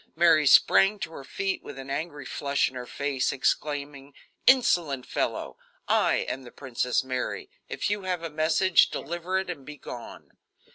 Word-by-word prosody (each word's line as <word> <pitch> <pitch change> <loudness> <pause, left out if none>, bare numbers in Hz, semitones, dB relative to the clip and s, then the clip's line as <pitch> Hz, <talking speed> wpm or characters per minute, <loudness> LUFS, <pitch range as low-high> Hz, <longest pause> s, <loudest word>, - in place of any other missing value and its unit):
Mary 160 -3 +5
sprang 195 +8 +6
to 190 -4 -5
her 140 - -9
feet 195 +7 -3
with - - -10
an 135 0 -7
angry 145 -1 -4
flush 140 +1 0
in - - -8
her 125 -1 -7
face, 140 -2 -1
exclaiming: 140 0 -2 0.3
"Insolent 170 - +4
fellow, - - -3 0.3
I - - +2
am 135 - -3
the 125 - -11
Princess 125 -2 -1
Mary; 130 -1 -4 0.2
if - - -2
you 205 0 -1
have 180 -3 -3
a 165 - -3
message, 160 +4 +3
deliver 175 +3 -3
it 190 - -2
and 170 -6 -6
be 150 +2 -10
gone." 120 -3 -10
150 Hz, 170 wpm, -27 LUFS, 135-175 Hz, 0.3 s, sprang